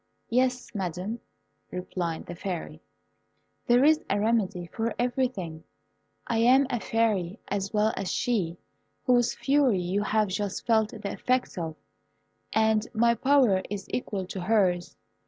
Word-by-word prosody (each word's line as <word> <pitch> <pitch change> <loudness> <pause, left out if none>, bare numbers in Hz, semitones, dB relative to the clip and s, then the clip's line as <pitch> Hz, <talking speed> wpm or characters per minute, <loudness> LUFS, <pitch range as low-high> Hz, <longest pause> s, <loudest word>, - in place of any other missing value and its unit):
"Yes, 250 0 +1
Madam," 190 +3 -3 0.5
replied 175 -2 -4
the - - -7
Fairy, 170 -3 -5 0.9
"there 245 +2 +5
is 310 +1 +4
a 200 - +1
remedy 205 -5 +1
for 230 0 -2
everything. 240 -10 -1 0.6
I 230 - 0
am 255 +4 +5
a 240 - 0
Fairy 215 -6 0
as 200 0 -2
well 215 +1 +2
as 195 -1 -3
she 185 -9 0 0.5
whose 245 -2 +3
fury 275 -6 +3
you 180 +3 -1
have 215 0 +1
just 200 +1 -3
felt 220 -2 +3
the 210 -3 -6
effects 250 +5 0
of, 165 -3 -4 0.8
and 220 0 +2
my 235 +1 +4
power 245 -5 +3
is 200 -1 -5
equal 200 -6 -2
to 190 0 -6
hers. 180 -3 +1
215 Hz, 135 wpm, -27 LUFS, 185-240 Hz, 0.9 s, there